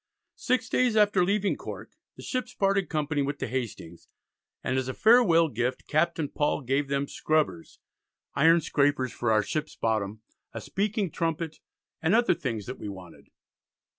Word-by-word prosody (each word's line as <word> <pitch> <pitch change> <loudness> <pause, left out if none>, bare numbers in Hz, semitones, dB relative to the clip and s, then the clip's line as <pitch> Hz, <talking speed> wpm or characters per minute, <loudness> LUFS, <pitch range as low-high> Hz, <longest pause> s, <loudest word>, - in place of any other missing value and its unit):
Six 255 -1 +1
days 250 -2 +2
after 205 -3 +4
leaving 200 +2 +1
Cork - - -8 0.2
the - - -11
ships 250 -1 -3
parted 195 -1 +1
company 150 -2 -1
with 140 +1 -2
the - - -3
Hastings, 115 -9 -5 0.6
and 130 - -1
as 130 -1 -1
a 130 - -4
farewell 215 -8 +5
gift 125 -1 -2
Captain 160 0 +1
Paul 145 +1 -1
gave 135 +2 0
them 140 0 -1
"Scrubbers, 150 - -1 0.6
Iron 165 +4 +5
Scrapers 145 -3 +1
for 120 -2 -1
our 110 -1 +3
ship's 155 +6 -4
bottom, 110 -1 -1 0.3
a - - -5
speaking 200 -2 -2
trumpet, 165 -1 -3 0.4
and 170 +6 +3
other 235 -3 +4
things 115 - -4
that 125 - -7
we 105 - -5
wanted." 95 -4 -11
150 Hz, 160 wpm, -27 LUFS, 125-190 Hz, 0.6 s, farewell